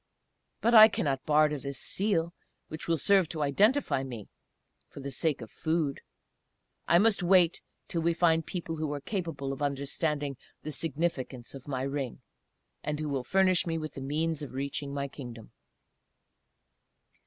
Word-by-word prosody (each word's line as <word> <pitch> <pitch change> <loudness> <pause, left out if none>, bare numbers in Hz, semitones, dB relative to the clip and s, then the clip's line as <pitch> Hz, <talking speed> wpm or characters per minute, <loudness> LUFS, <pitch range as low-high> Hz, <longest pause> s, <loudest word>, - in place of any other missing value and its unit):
But 235 - +3
I 220 -1 +11
cannot 135 -10 -2
barter 150 -1 +3
this 140 0 -5
Seal, 170 0 0 0.4
which 155 +1 -7
will 165 -1 +2
serve 190 0 +3
to 155 -3 -2
identify 205 - +2
me, 120 -6 -7 0.6
for - - -11
the 140 0 -5
sake 145 +1 0
of 115 - -9
food. 155 -4 -1 0.9
I 170 - +6
must 210 +1 +4
wait 180 -1 +4 0.3
till 165 - -2
we 170 +1 +1
find 165 -1 +3
people 165 -1 -5
who 155 -1 -2
are 145 - -3
capable 145 -5 -3
of 135 - -8
understanding 145 0 -1 0.3
the 155 - -4
significance 145 -6 -3
of 135 0 -10
my 130 -2 -2
ring, 135 -2 -4 0.6
and 150 0 -2
who 155 -1 -2
will 135 -3 -1
furnish 185 +4 +2
me 165 -1 -1
with 155 -2 -5
the 135 - -7
means 155 +3 -1
of 140 -3 -7
reaching 140 +1 -3
my 140 0 -2
Kingdom." 120 -5 -10
150 Hz, 160 wpm, -29 LUFS, 140-170 Hz, 0.9 s, I